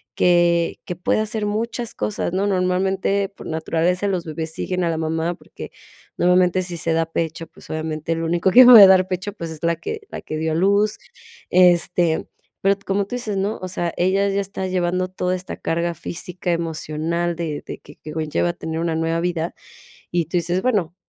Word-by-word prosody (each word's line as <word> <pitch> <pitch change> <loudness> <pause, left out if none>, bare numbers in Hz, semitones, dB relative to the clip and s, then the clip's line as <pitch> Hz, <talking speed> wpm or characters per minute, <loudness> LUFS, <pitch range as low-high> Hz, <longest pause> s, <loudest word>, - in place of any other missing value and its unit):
que 175 -1 +3
que 180 - -4
puede 180 +4 0
hacer 215 -1 -2
muchas 230 +3 -2
cosas, 205 -4 -2
¿no? 195 +2 +1
Normalmente, 190 +1 0
por 200 - -13
naturaleza, 165 +4 0
los 185 -3 -1
bebés 160 0 -4
siguen 180 -1 -2
a 170 - +1
la 160 - -1
mamá, 160 +2 -1
porque - - -11 0.5
normalmente, 180 +1 +3
si 175 -1 -4
se 165 0 -1
da 165 0 +1
pecho, 165 0 -3
pues - - -17
obviamente 155 +1 -3
lo 165 0 -3
único 170 +3 +1
que 255 +6 +9
puede 225 -6 +11
dar 185 -1 +5
pecho, 185 +2 -3
pues 165 -5 -6
es 155 - -9
la 170 0 +2
que 440 - -5
la - - -7
que 155 - -5
dio 160 0 -1
a - - -1
luz. 200 +4 +2 0.5
Este, 175 -2 +3 0.3
pero 195 +1 +3
como 195 +1 0
tú 205 - -10
dices, 215 -5 -3
¿no?, 200 +3 -1
o 185 - -4
sea, 175 -2 -3
ella 190 +3 +2
ya 200 0 0
está 195 -1 -5
llevando 185 0 0
toda 185 0 -1
esta 185 +1 -6
carga 170 +1 -1
física, 175 +2 -5
emocional, 165 +1 -2
de 160 -3 -4
de - - -7
que 145 - -15
que 155 - -9
conlleva 160 +2 -1
a - - -1
tener 160 -1 -5
una 165 -1 -1
nueva 165 +1 0
vida, 170 -1 -2 0.6
y 175 -1 +1
tú 175 +3 -2
dices, 175 +2 0
bueno, 190 -9 0
175 Hz, 200 wpm, -21 LUFS, 165-190 Hz, 0.6 s, puede